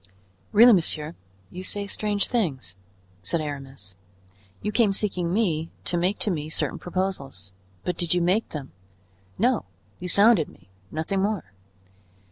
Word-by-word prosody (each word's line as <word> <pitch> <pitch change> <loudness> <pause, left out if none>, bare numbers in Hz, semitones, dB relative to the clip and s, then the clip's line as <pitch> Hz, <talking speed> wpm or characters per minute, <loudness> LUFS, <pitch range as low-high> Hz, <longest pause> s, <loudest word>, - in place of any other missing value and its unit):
"Really, 235 +3 +8
monsieur, 160 -4 +1 0.4
you 180 - -6
say 200 +2 -3
strange 205 0 0
things," 140 - -1 0.5
said 100 - -1
Aramis. 135 -9 -6 0.7
"You 210 - 0
came 210 -2 +3
seeking 180 -4 0
me 170 -6 +1 0.2
to - - 0
make 180 +4 +1
to 210 - +2
me 155 -3 -3
certain - - -1
proposals, 155 - -3 0.3
but 180 - -2
did 175 -2 -2
you 175 - +2
make 190 +6 +2
them? 145 -4 -6 0.7
No, 245 +2 +2 0.3
you 180 - -4
sounded 200 -2 +5
me, - - -20 0.2
nothing 160 - -1
more. 195 - -2
180 Hz, 140 wpm, -25 LUFS, 150-205 Hz, 0.7 s, Really